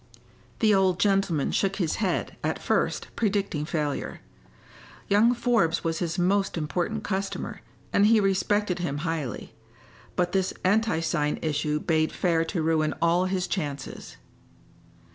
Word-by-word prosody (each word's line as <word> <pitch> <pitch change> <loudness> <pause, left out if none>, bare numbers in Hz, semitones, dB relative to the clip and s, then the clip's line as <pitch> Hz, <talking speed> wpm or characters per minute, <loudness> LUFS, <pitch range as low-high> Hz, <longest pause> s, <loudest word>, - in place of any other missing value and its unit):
The 215 -2 +5
old 190 -2 +3
gentleman 195 -8 +2
shook 195 -1 +1
his 175 -6 -1
head, 195 -4 -1
at - - 0
first, - - -1
predicting 200 -8 0
failure. 150 -3 -3 0.9
Young 215 +4 +5
Forbes 230 -9 +1
was 165 -1 -1
his 170 0 -2
most 195 +1 +1
important 175 +7 -2
customer, 195 -1 -3 0.3
and 205 - +5
he 225 0 +5
respected 195 -1 +1
him 165 -5 -2
highly; 160 -7 -3 0.6
but 175 -1 +1
this 190 -1 0
anti 205 -3 +2
sign 150 -3 0
issue 150 -1 0
bade 155 0 +1
fair 165 -3 +1
to 165 -1 -2
ruin 155 -1 +1
all 170 +2 +3
his 185 -1 -1
chances. 145 -7 -5
180 Hz, 135 wpm, -26 LUFS, 160-200 Hz, 0.9 s, The